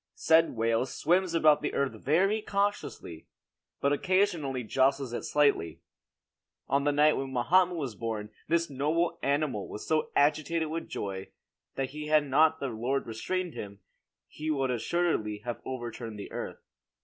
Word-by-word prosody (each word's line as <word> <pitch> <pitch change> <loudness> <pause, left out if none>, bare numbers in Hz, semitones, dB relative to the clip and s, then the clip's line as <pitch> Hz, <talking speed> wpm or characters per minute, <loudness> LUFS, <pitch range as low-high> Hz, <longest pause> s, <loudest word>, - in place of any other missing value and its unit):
Said 165 -2 +3
whale 115 +2 +1
swims 175 +6 +1
about 155 -2 +5
the 150 - -2
earth 140 -1 +1
very 195 +9 +1
cautiously, 200 - -3 0.5
but 140 +1 +2
occasionally 165 -7 +1
jostles 130 +2 +1
it - - -2
slightly. 140 - +1 0.9
On 140 +1 +1
the 145 - +3
night 150 +1 +4
when 135 0 -3
Mohammed 175 +9 +3
was 135 -7 -3
born 105 0 -4 0.2
this 170 +1 +2
noble 150 +5 0
animal 140 -7 0
was 105 - -8
so 155 -1 +1
agitated 155 +2 +2
with 165 +1 -4
joy, 95 -1 -5 0.5
that 135 -1 -2
had 150 0 +1
not 155 +4 +4
the 135 - -2
Lord 125 +4 -1
restrained 175 +10 -3
him, 100 -1 -8 0.5
he 155 +1 -6
would 135 -4 +1
assuredly 120 -6 -1
have 120 -1 -4
overturned 120 -3 -6
the 100 - -8
earth. - - -6
140 Hz, 150 wpm, -29 LUFS, 120-160 Hz, 0.9 s, about